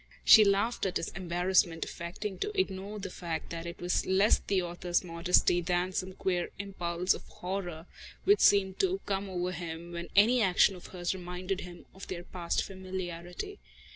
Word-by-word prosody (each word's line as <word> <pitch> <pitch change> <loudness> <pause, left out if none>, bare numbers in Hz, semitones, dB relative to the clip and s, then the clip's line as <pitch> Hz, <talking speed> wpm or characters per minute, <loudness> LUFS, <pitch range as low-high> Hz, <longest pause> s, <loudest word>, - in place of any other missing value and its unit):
She 220 - +9
laughed 200 +2 +1
at 190 - -1
his - - -3
embarrassment, 175 -2 +1
affecting 185 +3 -6
to 415 -1 -2
ignore 200 - -2
the 195 -2 -6
fact 170 -3 -5
that 170 0 -5
it 170 - -7
was 175 0 0
less 195 +3 +4
the 195 -2 0
author's 175 0 -1
modesty 175 0 +2
than 180 +1 0
some 185 0 -3
queer 180 -2 -1
impulse 180 -2 -1
of - - -7
horror 180 -3 -5 0.4
which 405 +1 +5
seemed 190 -2 +4
to 385 0 +1
come 195 0 -2
over 180 -1 -2
him 170 0 -6
when 170 0 -5
any 230 +5 +6
action 190 0 +4
of 180 - -11
hers 175 -1 -2
reminded 180 +1 -4
him 175 -1 -10
of 190 - -10
their 175 -2 -5
past 175 -2 -2
familiarity. 185 - -6
185 Hz, 170 wpm, -30 LUFS, 175-195 Hz, 0.4 s, She